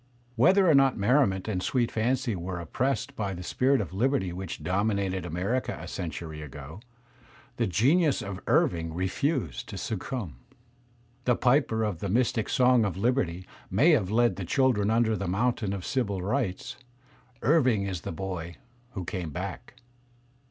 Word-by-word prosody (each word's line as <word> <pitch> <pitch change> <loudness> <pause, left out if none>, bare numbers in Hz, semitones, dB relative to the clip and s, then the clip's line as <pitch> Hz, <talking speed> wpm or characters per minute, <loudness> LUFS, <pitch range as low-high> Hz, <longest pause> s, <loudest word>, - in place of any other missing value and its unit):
Whether 185 - +5
or 160 - +6
not 135 -2 +4
merri 125 +7 +4
ment 95 0 -4
and 95 -4 -1
sweet 120 +5 0
f 110 - 0
anpy 125 -2 0
were 90 0 -4
oppressed 135 - -2
by 100 -5 -3
the 90 - -7
spirit 130 +8 +2
of 100 - -3
Kberty 110 -2 0
which 90 -4 -6
dominated 95 0 0
America 95 +10 -2
a - - -8
century 80 -2 -5
ago, 75 +4 -9 0.8
the - - +1
genius 140 - +3
of 100 -2 -5
Irving 80 -1 +1
refused 95 - -1
to 100 - -6
succumb. 110 - -4 0.9
The 125 - +3
piper 125 -4 +2
of 105 -6 -2
the 100 - -3
mystic 115 0 +1
song 125 -2 +4
of 95 -4 -2
Liberty 95 -6 0 0.2
may 130 - +4
have 110 - +2
led 120 +3 +2
the 100 - -4
children 110 +1 +2
under 110 0 +2
the 100 - -3
mountain 105 +2 0
of 100 -3 -4
Civil 100 -9 -1
Rights; 105 -2 -2 0.7
Irving 125 -7 +3
is 95 -3 -3
the - - -5
boy 85 -1 -5 0.4
who 95 -4 -5
came 90 -3 -4
back. 95 - -6
105 Hz, 160 wpm, -28 LUFS, 90-125 Hz, 0.9 s, or